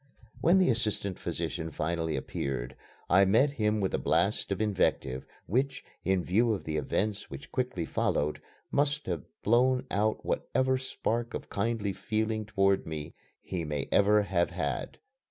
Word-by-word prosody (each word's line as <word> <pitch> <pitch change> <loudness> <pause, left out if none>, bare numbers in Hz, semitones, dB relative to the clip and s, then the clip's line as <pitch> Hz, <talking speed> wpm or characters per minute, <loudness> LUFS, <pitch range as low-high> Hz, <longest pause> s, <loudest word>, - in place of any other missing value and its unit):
When 175 +4 +5
the 185 -7 +5
assistant 105 -5 -1
physician 80 -1 -3
finally 80 +1 -1
appeared, 65 -2 -3 0.3
I 95 +2 +6
met 115 +9 +4
him 110 -5 +1
with 95 -2 0
a - - +1
blast - - +1
of 95 - 0
invective 95 -11 0 0.2
which, 130 +7 0 0.2
in 95 -1 +2
view 110 +6 +3
of 100 - -4
the 80 -1 -2
events 100 +8 -1
which 70 +1 -9
quickly 125 -10 -1
followed, 75 -1 0 0.3
must 145 +1 +1
have 85 -7 -3 0.2
blown 125 +3 +3
out 105 +2 0
whatever 130 +1 +1
spark 120 -2 -2
of - - -6
kindly 105 -1 0
feeling 110 0 -1
toward 100 -3 +2
me 75 -1 -5 0.3
he 90 -3 -3
may 75 -3 -2
ever 105 +1 +5
have 90 -3 +1
had. 75 -7 -3
100 Hz, 155 wpm, -30 LUFS, 85-115 Hz, 0.3 s, I